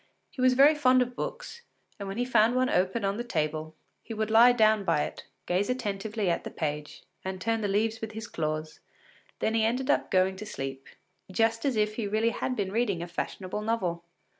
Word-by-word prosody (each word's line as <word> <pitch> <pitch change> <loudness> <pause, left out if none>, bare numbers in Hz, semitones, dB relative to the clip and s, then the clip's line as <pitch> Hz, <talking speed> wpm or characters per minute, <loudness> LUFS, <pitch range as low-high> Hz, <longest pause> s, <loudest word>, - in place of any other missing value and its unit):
He 260 - -6
was 255 0 +5
very 280 +4 +7
fond 255 -4 +4
of 245 0 -9
books, 475 - -6 0.4
and 200 - -5
when 195 +2 -5
he 245 - 0
found 245 -1 +3
one 255 0 +2
open 190 +4 +1
on 195 +1 0
the 240 - -2
table, 155 -6 -2 0.3
he 225 - -7
would 220 0 -2
lie 235 +2 +8
down 220 -3 +3
by 165 -5 +2
it, - - -7 0.2
gaze 185 +5 0
attentively 215 -3 -2
at 170 - 0
the - - -5
page 150 -1 -4 0.2
and 190 0 -4
turn 225 +3 0
the 205 - 0
leaves 220 +3 0
with 220 -1 -5
his 220 +1 -6
claws; 155 -4 -4 0.6
then 220 - +1
he 225 -1 +2
ended 245 +4 +1
by 290 - +3
going 190 0 +2
to 215 - -7
sleep, 135 -5 -6 0.4
just 225 +4 +1
as 270 -3 +1
if 215 0 0
he 225 - -1
had 200 - -4
really 225 +2 +2 0.2
been 195 -4 -2
reading 205 -6 0
a - - -6
fashionable 185 +3 -4
novel. 185 -6 -1
215 Hz, 215 wpm, -28 LUFS, 185-230 Hz, 0.6 s, lie